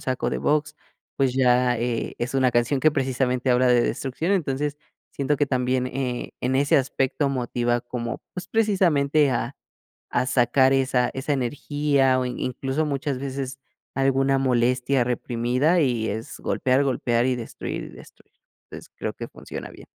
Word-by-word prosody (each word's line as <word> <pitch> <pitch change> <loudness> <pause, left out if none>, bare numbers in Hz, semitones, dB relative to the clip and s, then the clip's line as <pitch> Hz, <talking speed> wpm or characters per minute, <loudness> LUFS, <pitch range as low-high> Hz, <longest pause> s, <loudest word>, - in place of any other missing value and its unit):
saco 130 -1 -2
de - - -2
box, 150 0 0 0.4
pues, 135 -2 +2
ya, 125 -1 +3
eh, 120 -1 -2
es 120 +2 -3
una 130 -1 +3
canción 120 +3 +1
que, 155 - +5
precisamente, 130 -2 0
habla 125 +1 +4
de 120 -1 +5
destrucción. 140 +11 -1
Entonces, 145 -5 -1 0.4
siento 140 +1 0
que 145 - +1
también, 130 -1 0
eh, 125 -1 -3
en 130 +1 0
ese 140 +1 +3
aspecto, 135 +1 0
motiva 120 -2 0
como, 120 -2 -5
pues, 180 0 -6
precisamente, 155 -10 +2
a 120 +1 -2 0.6
a 125 - +1
sacar 130 +1 +3
esa 130 -2 +2
esa 135 +2 -2
energía, 140 0 +1
o 130 - 0
in 125 - -4
incluso, 135 +4 -2
muchas 140 -1 -2
veces, 135 0 -5 0.4
alguna 135 0 +2
molestia 125 0 +2
reprimida 125 +7 +1
y 120 -6 +1
es 110 +3 -5
golpear, 130 +2 +1
golpear 120 -3 +1
y 130 -1 +1
destruir, 115 - -5
y - - -9
destruir. - - -17 0.4
Entonces, - - -11
creo - - -3
que - - -7
funciona - - -8
bien. - - -14
130 Hz, 160 wpm, -24 LUFS, 125-140 Hz, 0.6 s, que